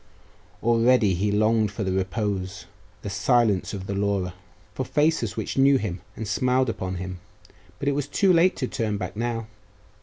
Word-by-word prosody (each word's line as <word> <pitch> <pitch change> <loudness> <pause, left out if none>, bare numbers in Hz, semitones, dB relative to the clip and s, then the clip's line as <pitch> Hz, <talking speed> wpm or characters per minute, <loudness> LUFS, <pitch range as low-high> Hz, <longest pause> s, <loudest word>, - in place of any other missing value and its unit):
Already 115 -2 +4
he 100 +4 0
longed 110 +1 +2
for 105 +1 -4
the 95 - -1
repose, 95 -1 -2 0.4
the - - -4
silence 105 -1 +2
of 95 -2 -6
the 100 - -3
Laura 100 -2 -1 0.4
for - - -2
faces 150 - +1
which - - -2
knew 135 0 +6
him 100 -7 -4
and 110 - -5
smiled 125 +5 +1
upon 95 -4 -3
him; 95 0 -6 0.6
but 140 - -4
it - - +4
was 145 0 -2
too 185 +5 +3
late 175 +2 +4
to 130 - -2
turn 110 -4 -2
back 90 0 -5
ow. 115 -1 -2
105 Hz, 175 wpm, -25 LUFS, 95-125 Hz, 0.6 s, knew